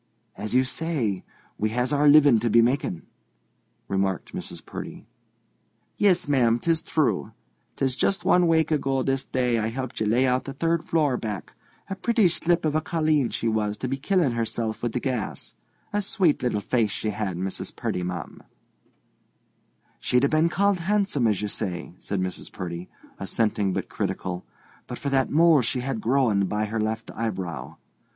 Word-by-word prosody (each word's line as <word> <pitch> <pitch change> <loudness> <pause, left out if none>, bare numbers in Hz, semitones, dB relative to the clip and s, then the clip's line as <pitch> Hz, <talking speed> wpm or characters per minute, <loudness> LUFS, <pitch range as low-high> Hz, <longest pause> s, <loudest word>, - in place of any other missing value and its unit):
"As 105 +3 -3
you 130 - +5
say, 130 - -2 0.4
we 110 - +1
has 125 +3 +1
our 145 +1 +3
living 145 -5 +7
to 120 +2 0
be 115 +2 +6
making," 120 -9 0 0.8
remarked 95 -2 -1
Mrs. - - -6
Purdy. - - -8 0.9
"Yis, 185 -6 +3
ma'am; 120 -5 +3
'tis 165 +5 0
true. 155 -2 0 0.4
'Tis 130 -2 0
just 195 +7 0
one 180 -1 +4
wake 160 -1 +3
ago 135 -3 +1
this 135 0 -1
day 125 -3 +1
I 110 - 0
helped 130 +2 -4
ye 110 - +1
lay 120 +5 +3
out 125 0 +1
the 135 - -5
third 165 +3 0
floor, 150 -6 +1
back. 105 -5 -5 0.3
A 195 - -4
pretty 220 0 +3
slip 170 0 +1
of 155 - +1
a 155 - +2
colleen 155 -5 +1
she 115 +2 -2
was 105 -2 0
to 130 - -3
be 135 - -1
killin' 160 0 +1
herself 115 -1 -2
wid 120 -1 -2
the 125 - 0
gas—a 130 - -5
swate 190 -6 +1
little 120 -4 0
face 115 0 +1
she 105 +2 -2
had, 105 -4 -3
Mrs. 95 +1 -4
Purdy, 90 - -2
ma'am." 90 -2 -5 1.6
"She'd 125 +1 +2
a 140 - +4
been 155 +2 +3
called 200 +1 +2
handsome, 190 - +1
as 105 -2 0
you - - 0
say," 90 -5 -4
said 100 - -3
Mrs. 95 0 -4
Purdy, 85 0 -6 0.3
assenting 105 0 0
but - - -2
critical, 90 -4 -4 0.4
"but - - -6
for 140 - -3
that 135 -1 +2
mole 160 -1 +5
she 125 +2 -1
had 135 -1 -2
a - - -5
growin' 110 -5 +2
by 105 +2 -1
her 110 +1 -3
left 110 +1 -2
eyebrow. 95 -7 -4
125 Hz, 175 wpm, -25 LUFS, 105-155 Hz, 1.6 s, living